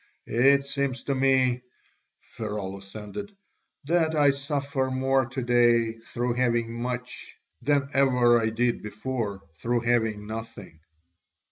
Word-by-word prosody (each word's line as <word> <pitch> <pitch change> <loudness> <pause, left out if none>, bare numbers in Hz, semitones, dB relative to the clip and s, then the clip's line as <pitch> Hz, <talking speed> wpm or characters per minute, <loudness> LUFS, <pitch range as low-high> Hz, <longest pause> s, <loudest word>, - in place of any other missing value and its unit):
It 140 +4 +4
seems 140 -2 -2
to 140 - -1
me," 130 -2 +2 0.6
Pheraulas 100 -2 -6
ended, 195 - -7 0.5
"that 160 +1 +1
I 145 -2 +5
suffer 140 -1 -2
more 130 0 +1
to 130 +1 -4
day 120 -2 +3
through 120 +1 -2
having 120 -2 0
much 125 +1 -5 0.2
than 140 -1 +2
ever 125 -3 +4
I 110 -1 +1
did 120 +2 0
before 105 -2 -4
through 115 +10 -1
having 115 -3 0
nothing." 110 -7 -8
120 Hz, 120 wpm, -26 LUFS, 115-135 Hz, 0.6 s, I